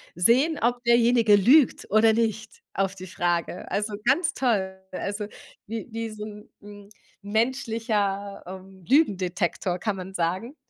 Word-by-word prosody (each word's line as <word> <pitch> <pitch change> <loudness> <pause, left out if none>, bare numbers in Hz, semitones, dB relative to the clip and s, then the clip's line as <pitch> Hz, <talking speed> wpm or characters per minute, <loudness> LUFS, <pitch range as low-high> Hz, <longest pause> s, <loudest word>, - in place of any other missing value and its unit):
sehen, 255 - +3
ob 245 +1 0
derjenige 235 -2 +5
lügt 250 +8 +4
oder 220 +1 +5
nicht, 220 -1 -2
auf 195 0 -1
die 185 -1 -9
Frage. 175 -1 -2
Also, 210 +1 -2
ganz 335 -1 +2
toll, 200 -7 0 0.2
also, 200 +3 -4 0.4
wie 225 0 -5
wie 225 0 -4
so 215 -1 -8
'n, 210 0 -11
ähm, 205 -1 -12 0.3
menschlicher, 215 -3 -1
ähm, 190 0 -11
Lügendetektor 185 - +1
kann 210 0 -2
man 190 0 -8
sagen. 185 - -2
210 Hz, 135 wpm, -25 LUFS, 190-230 Hz, 0.4 s, derjenige